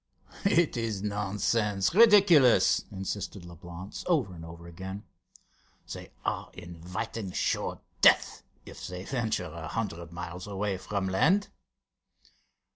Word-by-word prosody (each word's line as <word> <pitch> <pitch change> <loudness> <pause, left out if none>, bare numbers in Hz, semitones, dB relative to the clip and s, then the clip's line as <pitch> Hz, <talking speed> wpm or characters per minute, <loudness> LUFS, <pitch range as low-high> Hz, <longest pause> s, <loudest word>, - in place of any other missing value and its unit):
"It 170 -8 +3
is 110 -4 -2
nonsense, 105 0 0
ridiculous," 195 - +6
insisted 95 0 -5
Leblance, 85 +2 -9
over 140 - +1
and 80 -2 -10
over 85 +1 -10
again. 95 +4 -7 0.9
"They - - -9 0.2
are - - -2
inviting 90 +3 -6
sure - - -1 0.2
death - - +5 0.2
if - - -9
they 90 0 -6
venture 110 -5 -1
a 80 -1 -7
hundred 85 -5 -4
miles 90 +2 -7
away 100 -1 -2
from 100 0 -2
land." 165 - +2
95 Hz, 115 wpm, -29 LUFS, 90-115 Hz, 0.9 s, ridiculous